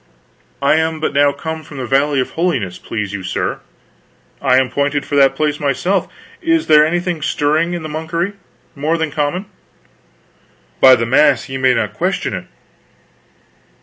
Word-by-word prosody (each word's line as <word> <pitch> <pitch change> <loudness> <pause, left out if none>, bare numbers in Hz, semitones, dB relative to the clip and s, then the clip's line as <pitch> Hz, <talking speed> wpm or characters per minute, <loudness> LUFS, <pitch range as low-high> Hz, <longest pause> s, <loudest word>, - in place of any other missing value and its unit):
"I 140 +3 +4
am 160 0 0
but 155 - -2
now 145 0 +4
come 160 +3 -6
from 145 - -11
the 130 - -4
Valley 135 +2 +2
of 130 - -2
Holiness, 135 - -1
please 105 -3 -4
you 100 - -4
sir." 95 - -3 0.8
"I 125 - +3
am 130 -1 +1
pointed 145 0 -1
for 145 - -3
that 135 -1 +4
place 150 0 -1
myself. 160 +7 0 0.3
Is 330 -1 +1
there 150 -1 +6
anything 175 +1 -1
stirring 155 +4 0
in 170 - -5
the - - -4
monkery, 165 +5 -3 0.4
more 155 +4 0
than 160 -2 -2
common?" 155 +6 -2 1.3
"By 130 -1 +8
the 115 -1 -1
mass 135 0 +3
ye 135 0 -4
may 130 -1 +3
not 105 -3 -1
question - - -2
it!.... - - -5
145 Hz, 165 wpm, -17 LUFS, 135-160 Hz, 1.3 s, By